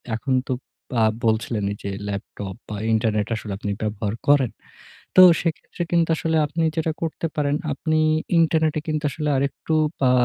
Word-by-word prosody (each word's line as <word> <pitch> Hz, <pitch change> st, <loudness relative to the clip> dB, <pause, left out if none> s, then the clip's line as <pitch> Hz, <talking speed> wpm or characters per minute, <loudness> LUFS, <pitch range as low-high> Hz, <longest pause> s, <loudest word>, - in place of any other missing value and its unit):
এখন 120 Hz, +4 st, -2 dB
তো -, -, 0 dB, 0.5 s
আ -, -, +5 dB, 0.2 s
বলছিলেন 110 Hz, -1 st, 0 dB, 0.2 s
যে, 100 Hz, -, -3 dB, 0.2 s
ল্যাপটপ 100 Hz, 0 st, -5 dB
বা 105 Hz, -, -4 dB, 0.2 s
ইন্টারনেট 110 Hz, -2 st, +1 dB
আসলে 110 Hz, -1 st, -6 dB
আপনি 105 Hz, -, -3 dB
ব্যবহার 105 Hz, -1 st, -2 dB
করেন। 140 Hz, -4 st, +4 dB, 0.6 s
তো 185 Hz, -, +9 dB, 0.2 s
সেক্ষেত্রে 165 Hz, +1 st, -3 dB
কিন্তু 170 Hz, -1 st, +3 dB
আসলে 160 Hz, 0 st, 0 dB
আপনি 165 Hz, +3 st, -2 dB
যেটা 160 Hz, 0 st, +1 dB
করতে 165 Hz, 0 st, -2 dB
পারেন, 145 Hz, -1 st, +1 dB, 0.2 s
আপনি 155 Hz, +2 st, 0 dB, 0.4 s
ইন্টারনেটে 160 Hz, -1 st, +2 dB
কিন্তু 155 Hz, 0 st, -1 dB
আসলে 150 Hz, -2 st, -2 dB
আরেকটু 140 Hz, +3 st, -2 dB, 0.3 s
আ -, -, +5 dB
145 Hz, 150 wpm, -23 LUFS, 110-160 Hz, 0.6 s, তো